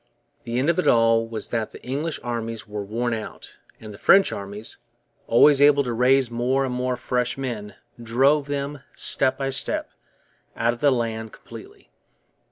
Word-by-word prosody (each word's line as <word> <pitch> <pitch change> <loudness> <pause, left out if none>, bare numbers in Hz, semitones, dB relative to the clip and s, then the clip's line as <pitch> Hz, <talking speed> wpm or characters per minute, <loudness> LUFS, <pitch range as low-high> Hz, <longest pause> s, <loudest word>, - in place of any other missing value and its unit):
The 120 +1 -3
end 130 +3 +1
of 175 - -3
it - - 0
all 115 -1 +4
was 110 -2 -4
that 115 -2 -2
the - - -14
English 145 +5 -3
armies 115 -2 -4
were 105 -1 -5
worn 115 +4 -2
out; 110 -1 -8 0.2
and 110 -2 -10
the 100 - -13
French 195 0 +5
armies, 100 +2 -5 0.5
always 140 +4 +5
able 145 0 +5
to 120 -2 -3
raise 125 +1 +3
more 125 +3 0
and 130 - -3
more 125 0 -1
fresh 125 0 -2
men, 110 -7 -5 0.3
drove 135 +6 +2
them, 145 0 -4
step 130 -1 +2
by 135 -1 -2
step, 135 - -2 0.6
out 115 +1 +1
of 120 - -11
the 145 - +5
land 110 -3 -3
completely. - - -13
120 Hz, 175 wpm, -23 LUFS, 115-135 Hz, 0.6 s, French